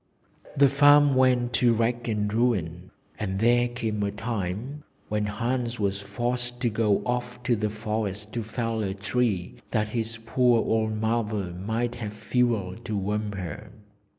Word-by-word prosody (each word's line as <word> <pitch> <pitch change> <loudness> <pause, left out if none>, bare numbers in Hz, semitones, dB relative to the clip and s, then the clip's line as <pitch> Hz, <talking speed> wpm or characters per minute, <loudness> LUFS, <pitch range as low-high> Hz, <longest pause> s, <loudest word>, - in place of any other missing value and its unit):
The 140 0 +7
farm 145 +1 +6
went 125 -2 +3
to 120 -2 +5
rack 120 +2 0
and 105 -2 -1
ruin, 95 -7 0 0.3
and 95 -2 -2
there 120 +2 +4
came 115 -3 -3
a 100 - +1
time 110 +6 -4 0.3
when 105 0 0
Hans 120 +2 -2
was 100 -1 0
forced 120 +4 -3
to 120 -3 +1
go 105 -2 +2
off 125 0 -3
to 120 0 +2
the 105 -1 -1
forest 105 -1 -3
to 120 - -1
fell 115 0 -2
a 95 -2 -2
tree 100 -2 -1
that 105 -2 0
his 115 0 -2
poor 125 0 +3
old 110 -1 0
mother 110 -5 -1
might 110 +6 -2
have 105 -2 -4
fuel 110 -4 0
to 105 - -2
warm 105 +1 -2
her. 95 +2 -6
110 Hz, 155 wpm, -26 LUFS, 105-120 Hz, 0.3 s, The